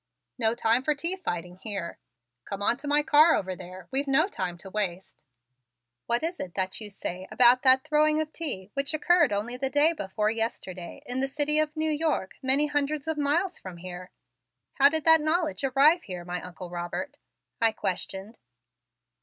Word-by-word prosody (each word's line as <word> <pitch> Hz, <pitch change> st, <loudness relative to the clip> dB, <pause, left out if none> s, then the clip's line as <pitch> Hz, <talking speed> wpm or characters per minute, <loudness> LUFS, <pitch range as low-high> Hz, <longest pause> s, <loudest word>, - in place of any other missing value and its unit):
No 225 Hz, -1 st, +2 dB
time 230 Hz, +1 st, +2 dB
for 300 Hz, +1 st, +1 dB
tea 335 Hz, +6 st, -1 dB
fighting 180 Hz, -, -5 dB
here. 195 Hz, -4 st, -5 dB, 0.5 s
Come 200 Hz, 0 st, -5 dB
on 220 Hz, -, +3 dB
to 285 Hz, +1 st, -8 dB
my 295 Hz, +1 st, +3 dB
car 305 Hz, +2 st, +6 dB
over 185 Hz, -1 st, -3 dB
there; 185 Hz, 0 st, -11 dB
we've 275 Hz, +2 st, -1 dB
no 275 Hz, +6 st, +4 dB
time 185 Hz, -, -4 dB
to 190 Hz, -, -11 dB
waste." 190 Hz, -5 st, -3 dB, 0.8 s
"What 235 Hz, +3 st, 0 dB
is 340 Hz, +2 st, -2 dB
it 180 Hz, -, -6 dB
that 190 Hz, +2 st, -3 dB
you 210 Hz, -, -7 dB
say 185 Hz, -2 st, -6 dB
about 250 Hz, 0 st, +5 dB
that 260 Hz, 0 st, +5 dB
throwing 305 Hz, 0 st, +2 dB
of 315 Hz, 0 st, -3 dB
tea 210 Hz, -, -5 dB
which 280 Hz, +2 st, -2 dB
occurred 350 Hz, -3 st, +3 dB
only 215 Hz, +5 st, -2 dB
the 270 Hz, +1 st, -2 dB
day 290 Hz, +4 st, +3 dB
before 210 Hz, -, -2 dB
yesterday 225 Hz, -1 st, -5 dB
in 250 Hz, -1 st, -3 dB
the 270 Hz, -, 0 dB
City 295 Hz, +2 st, +3 dB
of 310 Hz, 0 st, -1 dB
New 315 Hz, 0 st, 0 dB
York 300 Hz, -10 st, -1 dB
many 270 Hz, +3 st, +3 dB
hundreds 290 Hz, 0 st, -2 dB
of 320 Hz, -, -1 dB
miles 305 Hz, +6 st, 0 dB
from 185 Hz, -2 st, -9 dB
here? 180 Hz, +1 st, -9 dB, 0.7 s
How 280 Hz, +1 st, +8 dB
did 315 Hz, 0 st, -1 dB
that 320 Hz, -1 st, +7 dB
knowledge 310 Hz, -1 st, 0 dB
arrive 280 Hz, +6 st, +4 dB
here, 180 Hz, -3 st, -8 dB
my 180 Hz, 0 st, -4 dB
Uncle 180 Hz, 0 st, -9 dB
Robert?" 175 Hz, 0 st, -5 dB, 0.4 s
I 225 Hz, -1 st, +4 dB
questioned. 195 Hz, +1 st, -5 dB
260 Hz, 185 wpm, -27 LUFS, 190-300 Hz, 0.8 s, How